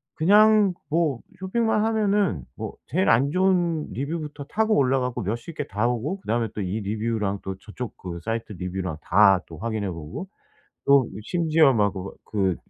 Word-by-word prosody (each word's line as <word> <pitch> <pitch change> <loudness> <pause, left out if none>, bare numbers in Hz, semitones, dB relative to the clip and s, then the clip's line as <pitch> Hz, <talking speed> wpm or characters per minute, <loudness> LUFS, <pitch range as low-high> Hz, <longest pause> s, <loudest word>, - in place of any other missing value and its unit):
그냥 210 +3 +5 0.2
뭐 155 -5 +1 0.2
쇼핑만 215 +3 +1
하면은 205 - +1
뭐 - - -6
제일 185 +8 +1
안 125 +5 +4
좋은 175 -3 +1
리뷰부터 150 0 -4
타고 220 +6 +1
올라가고 125 -2 +1
몇십 115 - -4
개 145 - -3
다 105 +3 -1
보고 125 - -1
그다음에 115 - 0
또 105 - -3
이 100 +3 -2
리뷰랑 105 -1 -2
또 95 - -4
저쪽 110 +3 -7
그 85 -2 -6
사이트 115 -1 -3
리뷰랑 90 -3 -4
다 95 +1 +5
또 80 - -10
확인해 110 -2 -2
보고 85 - -7 0.6
또 140 -2 +5
이 - - -6
심지어 160 - +3
막 105 -4 +2
그거 95 0 -6
그 95 -4 0
125 Hz, 310 characters per minute, -24 LUFS, 100-170 Hz, 0.6 s, 그냥